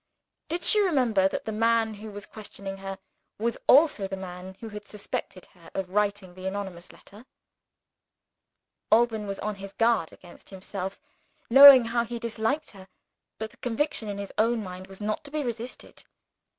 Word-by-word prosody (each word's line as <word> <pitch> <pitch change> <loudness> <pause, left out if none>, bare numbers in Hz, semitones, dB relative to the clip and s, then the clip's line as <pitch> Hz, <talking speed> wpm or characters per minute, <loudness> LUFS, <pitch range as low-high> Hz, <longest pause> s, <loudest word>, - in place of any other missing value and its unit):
Did 340 +2 -2
she 425 - +6
remember 250 - +3
that - - -4
the 220 - -3
man 225 0 +2
who 215 +1 -9
was 205 0 -9
questioning 200 -2 -8
her, 195 0 -6 0.4
was 230 +2 -2
also 275 -8 +5
the 190 0 -5
man 185 0 -8
who 225 - -7
had 210 -1 -9
suspected 200 -3 -6
her 170 -2 -16
of 190 -1 -3
writing 205 -2 0
the 185 +1 -7
anonymous 190 -3 -5
letter? 215 +6 -15 1.6
Alban 220 -2 +3
was 195 0 -4
on 210 0 -3
his 195 0 -9
guard 225 -7 +2
against 175 -1 -16
himself, 190 0 -6 0.5
knowing 270 -1 +11
how 235 +1 0
he 235 +1 -5
disliked 230 +6 -2
her. 190 -2 -14 0.5
But 220 0 -5
the - - -21
conviction 245 -2 -2
in 200 - -4
his 200 0 -7
own 225 0 +2
mind 185 0 -8
was 195 +1 -12
not 215 +9 -2
to - - -6
be 300 0 -2
resisted. 240 0 -7
210 Hz, 170 wpm, -27 LUFS, 195-235 Hz, 1.6 s, knowing